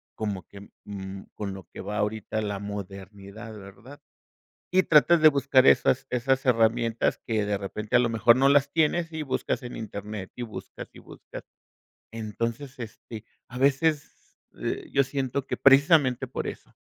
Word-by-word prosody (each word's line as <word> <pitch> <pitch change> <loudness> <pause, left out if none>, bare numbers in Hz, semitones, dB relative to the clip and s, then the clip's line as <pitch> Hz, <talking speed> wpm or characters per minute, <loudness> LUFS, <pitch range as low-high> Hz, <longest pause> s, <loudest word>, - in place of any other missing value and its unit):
como 100 -4 -4
que, 100 0 -13 0.2
mm, 95 -1 -7
con 100 -2 -5
lo 95 - -10
que - - -7
va 105 +2 -5
ahorita 110 +1 -2
la 100 -2 -3
modernidad, 100 +2 -8
¿verdad? 100 +8 -13 0.7
Y 185 +1 +4
tratas 165 0 +5
de 155 - +10
buscar 135 -2 +3
esas 130 +1 +4
esas 130 +2 0
herramientas 115 -1 +1
que 110 -3 0
de 105 -1 0
repente, 105 +4 -2
a - - +7
lo 120 -1 +1
mejor 115 +2 +4
no 135 +1 +4
las 140 0 +3
tienes 165 +1 +1
y 155 - -3
buscas 130 -2 -2
en 120 - -7
Internet, 105 -2 -7
y 125 - -5
buscas 110 -3 -8
y - - -15
buscas. - - -12 0.7
Entonces, 115 +4 -5
este, 110 -1 -9 0.2
a 125 - -8
veces, 145 +2 0 0.2
eh, - - -4
yo 140 - +4
siento 135 0 -3
que - - -2
precisamente 140 -2 +4
por - - -4
eso, - - -9
115 Hz, 165 wpm, -26 LUFS, 105-135 Hz, 0.7 s, de